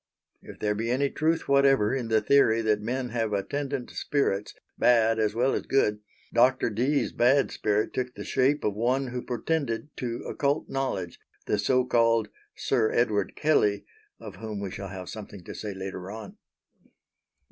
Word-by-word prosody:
If - - -11
there 105 -1 0
be 115 +3 -3
any 135 +3 +1
truth 160 +1 0
whatever 135 -5 +4
in 130 -3 -2
the 110 -1 +2
theory 115 -2 +4
that 105 -1 +1
men 125 +3 -2
have 115 -2 -1
attendant 135 +5 -3
spirits, 105 -9 -1 0.2
bad 115 -2 +3
as 105 -1 +1
well 125 +3 +2
as - - -3
good, 105 -6 +2 0.3
Dr. 125 0 +3
Dee's 130 +7 +1
bad 130 +4 +3
spirit 105 0 0
took 125 -1 -3
the - - -6
shape 140 +3 +1
of 105 - 0
one 125 +5 0
who 125 0 -4
pretended 135 +2 -2
to 120 -2 -4
occult 140 +2 -1
knowledge, 130 -10 -3 0.3
the 105 - 0
so 130 +3 +2
called 115 -3 +2 0.3
Sir 115 -5 +1
Edward 105 -4 +1
Kelley 105 -10 +2 0.3
of - - -10
whom 110 -2 -5
we 100 -2 -4
shall 100 +1 -6
have 95 -1 -7
something 100 -3 -9
to - - -8
say 105 - -5
later 95 -1 -6
on. 110 0 -8
115 Hz, 170 wpm, -27 LUFS, 105-135 Hz, 0.3 s, whatever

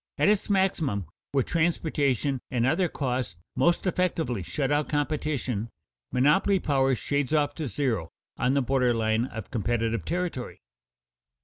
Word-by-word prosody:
At - - +4
its 210 0 +1
maximum 165 - +1 0.3
where 135 -2 +2
transportation 145 -6 0
and 120 -3 +1
other 180 +7 +2
costs 125 - -2 0.2
most 170 +2 +2
effectually 165 - 0
shut 135 - -2
out 145 0 +1
competition, 145 -7 -1 0.4
monopoly 150 +10 +3
power 135 -4 +2
shades 140 +5 -1
off 145 -1 +2
to 155 -1 -4
zero 115 - -1 0.3
on 130 +2 +1
the 140 - +3
border 125 -2 +2
line 110 +1 +1
of 110 -5 -8
competitive 115 -2 0
territory. 170 - -3
135 Hz, 135 wpm, -27 LUFS, 120-155 Hz, 0.4 s, At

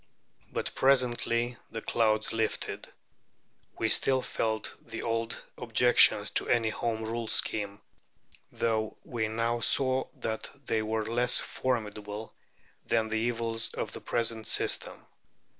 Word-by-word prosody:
But - - -3
presently 120 -2 +2
the 115 - -5
clouds 110 -2 +1
lifted. 115 -1 -2 0.9
We - - 0
still 130 -1 +2
felt 110 -1 -2
the 115 -1 -7
old 115 0 -2 0.2
objections 115 -3 +5
to - - +3
any 115 -2 +3
Home 110 0 -2
Rule 115 +1 -3
scheme, 105 -1 0 0.7
though 110 -1 -1
we 115 -3 -2
now 115 +2 -1
saw 130 +2 +2
that 110 0 -4 0.2
they 110 - 0
were 110 0 -2
less 120 +2 +3
formidable 105 -3 -3 0.5
than 110 -1 +1
the 110 - -1
evils 115 -1 -1
of - - -3
the - - -8
present 115 -2 -1
system. - - +1
115 Hz, 125 wpm, -29 LUFS, 110-120 Hz, 0.9 s, objections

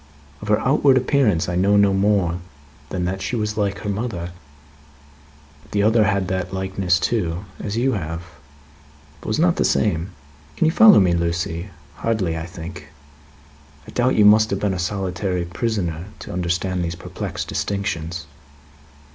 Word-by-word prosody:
Of 105 - -8
her 105 0 +3
outward 135 0 +4
appearance 125 - +2
I 90 - -2
know 100 +3 +3
no 100 -1 +4
more 95 -3 +2 0.5
than 90 -2 -2
that 95 +2 -3
she 110 - -2
was 105 -2 -2
like 100 -2 -1
her - - -5
mother. 100 -5 -4 1.4
The 100 -1 +2
other 110 0 +4
had 100 -3 +1
that 95 0 -2
likeness 95 -1 0
too 90 -2 -1
as 105 +1 -4
you 130 +3 +2
have 85 -5 -4 1.0
but - - -11
was 110 - 0
not 170 +1 +3
the - - +2
same. 90 -4 +1 0.5
Can - - +2
you 160 - +4
follow 215 +3 +8
me, 90 -3 +3
Lucie? 85 +1 -2 0.3
Hardly, 105 -8 -1
I 80 0 -5
think? 85 -1 -9 1.0
I - - -9
doubt 125 +1 +1
you 105 - +5
must 110 +1 +6
have 100 - -1
been 100 -2 0
a 90 - -3
solitary 90 -1 -2
prisoner 90 -3 -2
to - - -8
understand 90 +1 -1
these 85 0 -3
perplexed 85 - -5
distinctions." 90 -5 -3
95 Hz, 160 wpm, -21 LUFS, 85-105 Hz, 1.4 s, follow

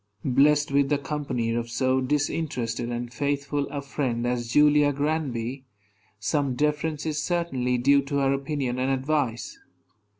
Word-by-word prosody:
Blessed 145 +3 +3
with 140 0 +3
the 145 - +2
company 135 -5 -2
of 115 0 -2
so 130 +2 +1
disinterested 130 -4 -1
and 120 0 -4
faithful 140 +1 -1
a 145 -1 -5
friend 130 -4 -2
as 120 -1 -1
Julia 150 +3 +4
Granby, 135 -4 -2 0.5
some 135 +5 0
deference 150 +2 -1
is 155 -1 -1
certainly 135 -8 0
due 140 +3 +4
to 140 +1 -4
her 135 -1 +2
opinion 135 -2 -2
and 130 +1 +1
advice. 135 -3 -1
140 Hz, 140 wpm, -26 LUFS, 125-150 Hz, 0.5 s, Julia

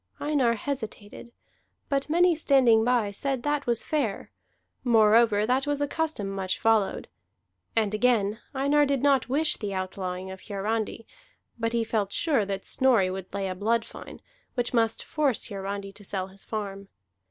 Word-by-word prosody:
Einar 275 -6 +2
hesitated. 225 -3 -6 0.6
But 275 0 -1
many 350 +2 +4
standing 265 -8 +4
by 235 -4 +2
said 265 +4 -3
that 290 -2 -1
was 235 -1 +1
fair; 270 -10 -2 0.5
moreover, 220 -2 +4
that 260 +4 +1
was 290 -1 0
a 290 - 0
custom 310 -9 -2
much 195 -1 -2
followed. 220 -3 +1 0.7
And 215 -2 +1
again, 215 -2 +2 0.2
Einar 285 +2 +3
did 275 -2 0
not 275 -3 +3
wish 300 +4 +2
the 200 -3 -4
outlawing 185 0 -4
of 190 0 -9
Hiarandi; 220 +2 -2 0.5
but 230 0 -1
he 235 -1 +1
felt 215 -3 -1
sure 275 -8 +1
that 195 -1 -4
Snorri 235 -8 +3
would 190 -1 -7
lay 195 0 -2
a 185 - -2
blood 225 +4 0
fine, - - -11 0.3
which 245 0 -1
must 225 -2 +1
force 285 -8 0
Hiarandi 195 0 -5
to 205 - -14
sell 190 -1 -4
his 195 +1 -12
farm. 200 -2 -5
225 Hz, 160 wpm, -27 LUFS, 200-270 Hz, 0.7 s, many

